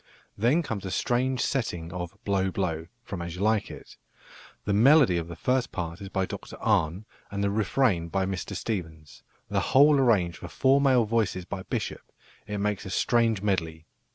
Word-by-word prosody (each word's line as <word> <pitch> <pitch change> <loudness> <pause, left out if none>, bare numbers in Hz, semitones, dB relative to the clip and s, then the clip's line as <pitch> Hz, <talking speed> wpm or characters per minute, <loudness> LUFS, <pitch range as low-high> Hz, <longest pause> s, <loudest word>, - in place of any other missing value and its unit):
Then 125 +11 +2
comes 110 -9 -4
a 95 - -4
strange 125 +5 0
setting 90 -10 -2
of 90 -2 -6
"Blow, 95 -1 +1
blow," 85 -4 -2 0.2
from 95 -5 -6
As 85 -1 -5
You 95 - -3
Like 110 -1 +2
It. - - -11 0.7
The 100 - 0
melody 130 - +6
of 85 -1 -3
the 85 - -8
first 125 +8 0
part 85 -1 -5
is 100 - -7
by 95 -1 0
Dr - - -8
Arne 100 -3 +1 0.2
and 100 0 -3
the 100 - +1
refrain 105 -4 +1
by 95 +2 -1
Mr 95 -1 -4
Stephens, 80 -8 -5 0.3
the - - 0
whole 145 +1 +5
arranged 95 - +2
for - - -7
four 135 +1 +3
male 130 -4 +4
voices 105 -5 0
by 95 0 -5
Bishop; - - -4 0.5
it 105 0 -3
makes 105 0 -1
a - - -7
strange 115 -1 +1
medley! 80 -6 -1
100 Hz, 180 wpm, -27 LUFS, 90-115 Hz, 0.7 s, melody